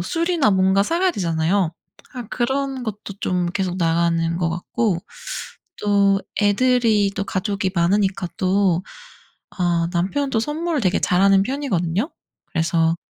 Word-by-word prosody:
술이나 330 Hz, -, +1 dB
뭔가 190 Hz, +1 st, +3 dB
사 335 Hz, +11 st, -1 dB
가야 375 Hz, 0 st, +3 dB
되잖아요. 170 Hz, -, 0 dB, 0.4 s
아 250 Hz, -, -4 dB
그런 265 Hz, +1 st, -1 dB
것도 210 Hz, -3 st, -6 dB
좀 180 Hz, -1 st, 0 dB
계속 180 Hz, 0 st, -2 dB
나가는 165 Hz, -1 st, +1 dB
것 170 Hz, -2 st, +1 dB
같고 175 Hz, +3 st, -1 dB, 0.8 s
또 200 Hz, -1 st, +3 dB, 0.2 s
애들이 215 Hz, -1 st, +3 dB
또 200 Hz, -, -1 dB
가족이 195 Hz, 0 st, -2 dB
많으니까 190 Hz, +1 st, +1 dB
또 185 Hz, -3 st, +2 dB, 0.7 s
아 170 Hz, -2 st, 0 dB
남편은 235 Hz, +12 st, 0 dB
또 225 Hz, -, +2 dB
선물을 310 Hz, +3 st, -2 dB
되게 185 Hz, -2 st, +1 dB
잘하는 195 Hz, +1 st, +4 dB
편이거든요. 225 Hz, -, -1 dB, 0.4 s
그래서 165 Hz, -1 st, +1 dB
195 Hz, 275 characters per minute, -21 LUFS, 175-235 Hz, 0.8 s, 잘하는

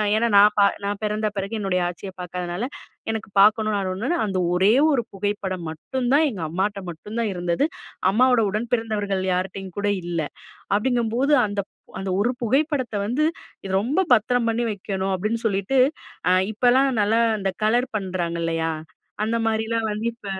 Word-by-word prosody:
ஏன்னா 230 Hz, +2 st, +2 dB
நான் 205 Hz, +1 st, +7 dB
பா 205 Hz, -, +6 dB, 0.2 s
நான் 200 Hz, 0 st, -2 dB
பிறந்த 215 Hz, +1 st, 0 dB
பிறகு 195 Hz, +2 st, -3 dB
என்னுடைய 190 Hz, -3 st, 0 dB
ஆச்சிய 180 Hz, +2 st, -7 dB
பார்க்காதனால, 180 Hz, +3 st, -4 dB, 0.5 s
எனக்கு 220 Hz, -1 st, -5 dB
பார்க்கணும் 215 Hz, +1 st, +4 dB
நான் 195 Hz, -2 st, -1 dB
ஒன்னு 250 Hz, -, -1 dB
அந்த 195 Hz, -2 st, -2 dB, 0.2 s
ஒரே 190 Hz, +4 st, +4 dB, 0.2 s
ஒரு 245 Hz, -4 st, +1 dB
புகைப்படம் 195 Hz, -3 st, -3 dB
மட்டும் 240 Hz, +11 st, -3 dB
தான் 305 Hz, +3 st, +5 dB
எங்க 205 Hz, -9 st, -6 dB
அம்மாட்ட 195 Hz, +4 st, -1 dB
மட்டும் 190 Hz, +7 st, -8 dB
தான் 225 Hz, -3 st, 0 dB
இருந்தது. 175 Hz, -, 0 dB, 0.4 s
அம்மாவோட 250 Hz, +2 st, +4 dB
உடன் 215 Hz, +4 st, -3 dB
பிறந்தவர்கள் 205 Hz, -4 st, -1 dB
யார்ட்டயும் 185 Hz, 0 st, -3 dB
கூட 205 Hz, 0 st, 0 dB, 0.2 s
இல்ல. 170 Hz, -1 st, -1 dB, 0.5 s
அப்படிங்கும்போது 240 Hz, +4 st, +1 dB
அந்த 205 Hz, 0 st, -2 dB, 0.4 s
அந்த 190 Hz, 0 st, -4 dB
ஒரு 230 Hz, +5 st, +2 dB
புகைப்படத்தை 260 Hz, -1 st, 0 dB
வந்து 255 Hz, +7 st, 0 dB, 0.4 s
இது 190 Hz, -, -4 dB
ரொம்ப 280 Hz, -, +1 dB
பத்திரம் 245 Hz, +1 st, +2 dB
பண்ணி 230 Hz, +1 st, 0 dB
வைக்கணும். 195 Hz, -1 st, -3 dB
அப்படின்னு 215 Hz, +5 st, -1 dB
சொல்லிட்டு, 200 Hz, +4 st, 0 dB, 0.5 s
அ -, -, +4 dB, 0.2 s
இப்போலாம் 250 Hz, +5 st, +3 dB
நல்லா 215 Hz, +3 st, +2 dB, 0.2 s
இந்த 195 Hz, 0 st, 0 dB
கலர் 245 Hz, +4 st, +1 dB
பண்றாங்க 180 Hz, -4 st, -3 dB
இல்லையா, 165 Hz, 0 st, 0 dB, 0.5 s
அந்த 230 Hz, +1 st, 0 dB
மாரிலாம் 220 Hz, 0 st, 0 dB
வந்து 210 Hz, +2 st, -4 dB
இப்ப 230 Hz, -, -19 dB
210 Hz, 160 wpm, -23 LUFS, 190-230 Hz, 0.5 s, நான்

